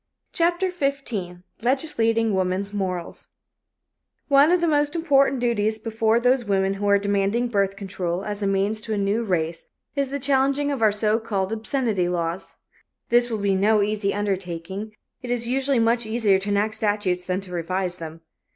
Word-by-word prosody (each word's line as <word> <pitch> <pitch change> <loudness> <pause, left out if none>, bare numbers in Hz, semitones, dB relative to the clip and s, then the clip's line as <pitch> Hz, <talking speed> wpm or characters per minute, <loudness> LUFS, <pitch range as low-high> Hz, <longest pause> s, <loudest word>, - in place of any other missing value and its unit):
CHAPTER 345 +2 +1
XV 250 - -3 0.2
LEGISLATING 230 -4 +1
WOMAN'S 190 +2 -1
MORALS 185 -4 -4 1.0
One 280 +2 +6
of 360 +1 +4
the 295 -4 +2
important 275 -5 +3
duties 220 -3 0
before 225 +1 +1
those 250 +1 +2
women 195 -2 +1
who 205 +1 -3
are 200 - +6
demanding 200 +4 0
birth 200 -3 0
control 190 -2 -4
as 210 0 -3
a 200 - 0
means 200 +2 0
to 220 0 -4
a - - -3
New 200 +3 0
Race 165 -5 -2 0.3
is 280 -2 0
the 280 - -3
changing 275 +1 +1
of 270 -4 -3
our 215 -2 +5
so 210 +1 +2
called 205 -3 -2
obscenity 225 -5 -1
laws. 175 0 -3 0.5
This 240 0 +3
will 225 - -2
be 200 -1 +1
no 205 +2 +3
easy 205 -1 -1
undertaking; 195 0 -4 0.3
it 250 - -7
is 240 -1 0
usually 270 +2 +1
much 230 0 +2
easier 220 -4 +2
to 200 +2 -5
enact 205 +2 +1
statutes 205 -4 0
than 185 0 0
to 190 -2 -12
revise 180 +1 -2
them. 165 0 -8
210 Hz, 170 wpm, -23 LUFS, 195-245 Hz, 1.0 s, One